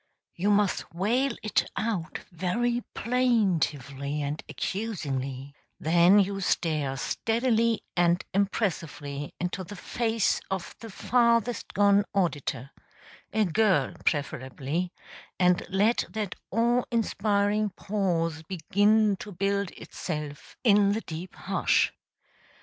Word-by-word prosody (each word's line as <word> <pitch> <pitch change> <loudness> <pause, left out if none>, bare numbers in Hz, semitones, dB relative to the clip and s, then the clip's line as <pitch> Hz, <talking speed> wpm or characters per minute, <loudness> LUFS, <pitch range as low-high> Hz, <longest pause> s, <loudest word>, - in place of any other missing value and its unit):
(You 190 +4 0
must 205 -1 +1
wail 240 +9 +1
it 215 - +1
out 200 -6 -2
very 235 +8 0
plaintively 155 - 0
and 145 +2 -3
accusingly; 140 - -3 0.3
then 170 +4 +5
you 195 0 0
stare 150 -7 0
steadily 230 - +1
and 175 0 +2
impressively 165 -8 -2
into 180 +2 -2
the 205 +3 -9
face 225 +2 0
of 190 -2 -4
the 225 - -9
farthest 235 +2 +1
gone 200 0 +5
auditor 145 -8 -1 0.6
a 215 0 +2
girl, 205 +2 +2
preferably 145 +3 -2 0.5
and 180 -1 +3
let 205 +5 +2
that 210 -3 -3 0.2
awe 240 +2 +2
inspiring 210 -2 +1
pause 175 -6 -1
begin 205 +5 +2
to 205 - -8
build 200 +1 0
itself 150 -4 -6
in 205 -3 +5
the 220 - -2
deep 170 0 -7
hush. - - +1
195 Hz, 105 wpm, -27 LUFS, 160-215 Hz, 0.6 s, then